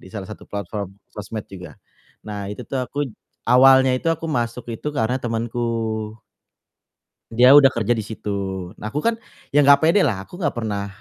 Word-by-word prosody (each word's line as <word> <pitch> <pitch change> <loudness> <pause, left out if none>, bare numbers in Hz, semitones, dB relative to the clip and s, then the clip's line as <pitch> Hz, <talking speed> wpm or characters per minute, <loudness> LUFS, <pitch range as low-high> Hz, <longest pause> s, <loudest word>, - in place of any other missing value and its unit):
di - - -14
salah 100 -2 -6
satu 105 - -10
platform 100 -1 -5 0.2
sosmed 105 +1 -6
juga. 90 -2 -11 0.5
Nah, 105 -2 -5
itu - - -9
tuh 135 - -2
aku 145 +2 -3
j - - -14 0.4
awalnya 130 +1 +6
itu 145 - -2
aku 165 0 -5
masuk 120 -3 -3
itu 130 - -5
karena 125 -2 0
temanku 115 0 -3 1.7
dia 125 +3 +6
udah 140 -1 +9
kerja 115 -4 -1
di 115 -3 +1
situ. 100 -4 -5
Nah, 110 - -5
aku 150 - -3
kan 230 0 +1 0.3
ya 145 - +4
gak 140 +1 +6
pede 165 +6 +4
lah 100 -8 -1
aku 175 - -12
gak 150 -7 -1
pernah, 105 -4 -3
115 Hz, 180 wpm, -21 LUFS, 105-135 Hz, 1.7 s, udah